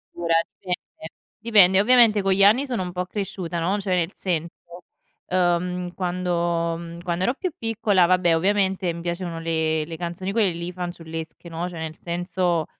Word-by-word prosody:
Ora 170 -1 0 0.2
dipende, 180 -3 -6 0.3
dipende, 205 -5 +5
ovviamente 230 -2 +5
con 195 0 +1
gli 195 +1 +4
anni 225 +8 +5
sono 245 -8 -2
un 180 - -5
po' 180 +1 -3
cresciuta, 185 -3 -4
no, 180 +5 0
cioè 195 -2 -1
in 170 -2 +1
senso, 170 -3 -2 0.8
ehm, 180 0 0
quando, 175 -2 -1
mh, 170 0 -8
quando 175 0 -1
ero 245 - +2
più 370 +4 -3
piccola 215 - +2
vabbè 175 -1 +3
ovviamente 190 0 +1
mi 170 - -7
piacevano 170 -1 -4
le 160 -1 0
le 165 +1 -7
canzoni 175 +3 -4
quelle 205 -3 +2
lì 170 +1 -5
fanciullesche, 170 -2 -7
no, 170 +2 -4
cioè 170 -2 -8
nel 160 0 -5
senso, 175 -1 -1
180 Hz, 170 wpm, -24 LUFS, 170-190 Hz, 0.8 s, dipende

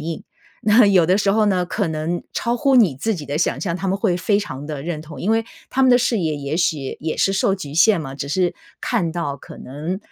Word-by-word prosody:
应。 160 +1 -5 0.4
那 220 +1 +6
有 190 -4 +5
的 185 +3 +3
时 200 -1 +2
候 215 0 +3
呢， 185 -3 +1
可 195 0 -1
能 160 +2 -3
超 235 +1 -1
乎 275 +1 +3
你 205 - +5
自 220 +11 -1
己 155 -5 -7
的 145 - -3
想 170 - 0
象， 170 -4 -2
他 190 +2 -4
们 190 - +1
会 180 -3 +1
非 200 +3 +1
常 145 -9 -6
地 150 -3 -5
认 160 -1 -4
同， 155 -1 -10
因 200 - 0
为 225 0 +2 0.3
他 265 - +1
们 260 - +5
的 245 - +6
视 240 -2 +1
野 160 -4 -1
也 145 +2 -3
许 155 -6 -1
也 155 +1 -3
是 195 - +2
受 195 0 +2
局 150 -7 -8
限 180 +3 +4
嘛， 135 -3 -7
只 140 0 -5
是 180 +4 0 0.3
看 195 -9 0
到 145 -5 -3
可 - - -13
能 155 +8 -5
175 Hz, 275 characters per minute, -21 LUFS, 155-205 Hz, 0.4 s, 那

